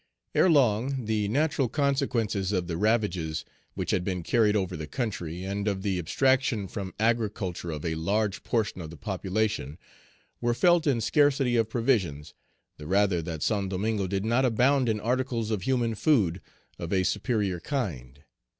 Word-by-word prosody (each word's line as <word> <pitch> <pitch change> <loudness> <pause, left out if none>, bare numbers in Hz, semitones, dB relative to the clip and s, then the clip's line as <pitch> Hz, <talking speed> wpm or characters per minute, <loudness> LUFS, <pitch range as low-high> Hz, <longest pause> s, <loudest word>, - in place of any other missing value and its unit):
ERELONG, 130 - +3
the 105 -1 0
natural 140 +2 +1
consequences 125 -9 0
of 90 -3 0
the 85 -1 -3
ravages 95 -6 0 0.3
which - - -2
had 90 - +1
been 90 -2 -3
carried 110 +2 +3
over 95 -3 -1
the 75 0 -6
country, 90 - -4
and 100 +2 -3
of 95 -2 -1
the 95 -3 0
abstraction 130 - +1
from 95 -1 -5
agriculture 110 -6 -1
of 75 -1 -5
a 80 - 0
large 100 +5 -1
portion 110 -5 -1
of 80 - -7
the 85 - -10
population, 95 -4 -2 0.6
were 120 0 +1
felt 175 +2 +4
in 125 -5 +2
scarcity 135 -1 +3
of 115 -2 +2
provisions, 105 - 0 0.4
the 75 - -9
rather 95 -1 +2
that 80 -2 -5
Saint 100 -3 0
Domingo 100 +1 -1
did 95 +2 -2
not 120 +4 +2
abound 130 +2 +3
in 110 -1 0
articles 120 -1 -1
of 105 -3 -1
human 120 0 0
food 105 - +2 0.4
of 85 - -5
a 95 -2 +2
superior 105 -3 0
kind. 75 - -4
105 Hz, 160 wpm, -27 LUFS, 90-120 Hz, 0.6 s, felt